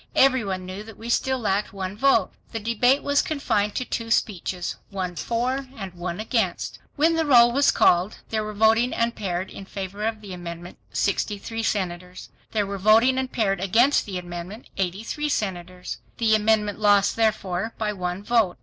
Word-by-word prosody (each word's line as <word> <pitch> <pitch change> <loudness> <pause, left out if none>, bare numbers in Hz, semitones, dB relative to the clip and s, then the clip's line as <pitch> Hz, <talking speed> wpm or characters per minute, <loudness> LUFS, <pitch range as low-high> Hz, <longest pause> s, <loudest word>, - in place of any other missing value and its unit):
Every 260 -3 +5
one 190 -2 -3
knew 185 +2 -6
that 220 0 -11
we 230 +1 -8
still 265 +2 +1
lacked 205 -4 -1
one 190 0 -4
vote. 230 -4 +3 0.2
The 225 - -2
debate 235 +5 +2
was 285 0 +3
confined 210 -9 -1
to 255 - -1
two 230 -2 -4
speeches, 185 -5 -1
one 185 -3 -4
for 255 +7 -1
and 195 -4 -6
one 175 0 -5
against. 215 -4 -1 0.2
When 320 +3 +3
the 325 - +2
roll 240 -5 +6
was 280 +3 +3
called, 180 +4 +3
there 220 -1 -1
were 215 0 -6
voting 225 +3 +3
and 230 0 +1
paired 185 -2 -3
in 195 - -9
favor 195 +1 -6
of 220 -1 -3
the 200 -3 -8
amendment, 175 0 -8
63 210 +2 -1
senators; 180 -4 -3 0.2
there 210 -2 0
were 200 0 -5
voting 225 +6 +5
and 260 -1 -3
paired 195 -5 0
against 230 +9 +3
the 190 -2 -4
amendment 175 +5 -7
83 205 +11 -2
senators. 180 -6 -3 0.2
The 225 -2 +3
amendment 215 -1 +2
lost 205 -1 +4
therefore, 215 -2 0
by 210 -1 -1
one 180 0 -4
vote. 215 - +2
210 Hz, 175 wpm, -24 LUFS, 185-230 Hz, 0.2 s, roll